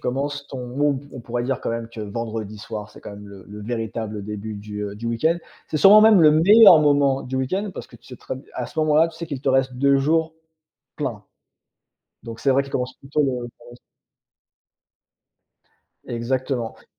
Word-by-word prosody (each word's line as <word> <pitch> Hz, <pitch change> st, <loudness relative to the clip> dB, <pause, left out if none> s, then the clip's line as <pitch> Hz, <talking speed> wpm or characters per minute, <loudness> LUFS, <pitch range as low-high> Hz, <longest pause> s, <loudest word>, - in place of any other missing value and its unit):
commences 140 Hz, +3 st, -3 dB
ton 125 Hz, -2 st, -6 dB
non, 140 Hz, +1 st, 0 dB
on -, -, -9 dB
on 125 Hz, -, -7 dB
pourrait 120 Hz, +1 st, -3 dB
dire, 130 Hz, 0 st, -2 dB
quand -, -, -3 dB
même, 115 Hz, 0 st, -4 dB
que 115 Hz, -1 st, -9 dB
vendredi 110 Hz, 0 st, -5 dB
soir, 105 Hz, -1 st, -7 dB
c'est -, -, -15 dB
quand -, -, -9 dB
même 105 Hz, 0 st, -11 dB
le 100 Hz, -2 st, -13 dB
le 105 Hz, 0 st, -9 dB
véritable 110 Hz, -2 st, -4 dB
début 105 Hz, +1 st, -6 dB
du, 105 Hz, 0 st, -7 dB
heu, 100 Hz, -, -6 dB
du 115 Hz, +2 st, -6 dB
week-end. 155 Hz, +9 st, +1 dB, 0.3 s
C'est 155 Hz, -, -2 dB
sûrement 200 Hz, +6 st, +8 dB
même 215 Hz, -4 st, +6 dB
le 155 Hz, -1 st, +7 dB
meilleur 180 Hz, +2 st, +7 dB
moment 140 Hz, -2 st, +2 dB
du 130 Hz, +1 st, -5 dB
week-end 190 Hz, +10 st, -2 dB
parce -, -, -7 dB
que -, -, -15 dB
tu -, -, -29 dB
sais 125 Hz, -, -10 dB
très 130 Hz, -, -7 dB
b -, -, -10 dB
à 125 Hz, -, -4 dB
ce 155 Hz, -, -10 dB
moment-là, 155 Hz, +2 st, +3 dB
tu 165 Hz, -, -14 dB
sais 170 Hz, 0 st, -6 dB
qu'il 140 Hz, -4 st, -5 dB
te 135 Hz, -, -2 dB
reste 130 Hz, -1 st, +2 dB
2 140 Hz, +1 st, +3 dB
jours 160 Hz, +3 st, +1 dB, 0.6 s
pleins. -, -, -4 dB, 1.0 s
Donc 115 Hz, -1 st, -8 dB
c'est 135 Hz, -, +2 dB
vrai 135 Hz, +1 st, +2 dB
qu'il 140 Hz, -, -12 dB
commence 125 Hz, 0 st, -2 dB
plutôt 140 Hz, +2 st, -1 dB
le 140 Hz, -, +2 dB
vendredi 120 Hz, -1 st, -5 dB, 0.2 s
s -, -, -15 dB, 2.3 s
Exactement, 120 Hz, 0 st, -2 dB
oui. -, -, -22 dB
130 Hz, 210 wpm, -22 LUFS, 115-145 Hz, 2.3 s, sûrement